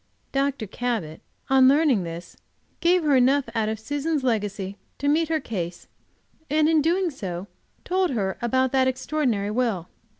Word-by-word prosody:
Dr. 275 Hz, -3 st, 0 dB
Cabot, 210 Hz, -7 st, -3 dB, 0.3 s
on 265 Hz, -1 st, +6 dB
learning 280 Hz, -5 st, +4 dB
this, 170 Hz, +1 st, -8 dB, 0.4 s
gave 350 Hz, 0 st, +3 dB
her 295 Hz, -3 st, +3 dB
enough 265 Hz, +2 st, +4 dB
out 220 Hz, -2 st, 0 dB
of 220 Hz, -1 st, -3 dB
Susan's 290 Hz, +5 st, -2 dB
legacy 205 Hz, -5 st, -1 dB, 0.2 s
to 285 Hz, -, -2 dB
meet 315 Hz, +2 st, +2 dB
her 320 Hz, -1 st, +1 dB
case, 175 Hz, -, -5 dB, 0.6 s
and 305 Hz, +1 st, +3 dB
in 320 Hz, -1 st, +4 dB
doing 345 Hz, +3 st, +1 dB
so 185 Hz, -8 st, -5 dB, 0.4 s
told 370 Hz, 0 st, +1 dB
her 195 Hz, -7 st, -1 dB
about 260 Hz, +2 st, +1 dB
that 265 Hz, -1 st, +3 dB
extraordinary 255 Hz, -6 st, -1 dB
will. 215 Hz, -7 st, -1 dB
260 Hz, 155 wpm, -24 LUFS, 210-295 Hz, 0.6 s, on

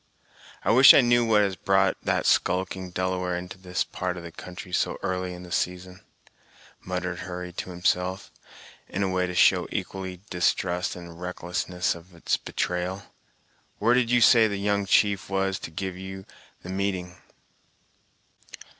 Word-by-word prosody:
"I -, -, +3 dB
wish 130 Hz, +4 st, +9 dB
I -, -, +8 dB
knew 120 Hz, -1 st, +4 dB
what 110 Hz, -2 st, +4 dB
has 100 Hz, -2 st, -1 dB
brought 95 Hz, +1 st, +2 dB
that -, -, 0 dB
skulking 95 Hz, 0 st, +1 dB
Delaware 90 Hz, 0 st, -1 dB
into 90 Hz, +1 st, -8 dB
this 90 Hz, -1 st, -2 dB
part 90 Hz, -1 st, -4 dB
of 85 Hz, -, -8 dB
the 85 Hz, -, -8 dB
country 90 Hz, +3 st, -10 dB
so -, -, 0 dB
early 90 Hz, 0 st, -2 dB
in 90 Hz, 0 st, -9 dB
the 90 Hz, -, -12 dB
season," 90 Hz, +1 st, -2 dB, 0.8 s
muttered 90 Hz, -1 st, -3 dB
Hurry 90 Hz, -1 st, -6 dB
to 95 Hz, -, -5 dB
himself, 90 Hz, +1 st, -1 dB, 0.6 s
in 100 Hz, -, -2 dB
a 95 Hz, -, 0 dB
way 90 Hz, 0 st, 0 dB
to 90 Hz, -, -5 dB
show -, -, +4 dB
equally 95 Hz, -2 st, -5 dB
distrust 90 Hz, 0 st, 0 dB
and 85 Hz, -1 st, -9 dB
a -, -, -10 dB
recklessness 90 Hz, +1 st, -2 dB
of 85 Hz, +1 st, -14 dB
its 85 Hz, -, 0 dB
betrayal. 90 Hz, +2 st, -3 dB, 0.6 s
"Where 115 Hz, +4 st, +3 dB
did 125 Hz, -2 st, +2 dB
you 120 Hz, 0 st, +3 dB
say 115 Hz, -1 st, +7 dB
the 100 Hz, -2 st, -3 dB
young 100 Hz, 0 st, 0 dB
chief 100 Hz, -2 st, +2 dB
was 95 Hz, 0 st, 0 dB
to -, -, -7 dB
give 95 Hz, +3 st, -4 dB
you 95 Hz, +1 st, -8 dB, 0.4 s
the 90 Hz, -, -8 dB
meeting?" 95 Hz, -2 st, -2 dB
90 Hz, 165 wpm, -26 LUFS, 90-95 Hz, 0.8 s, wish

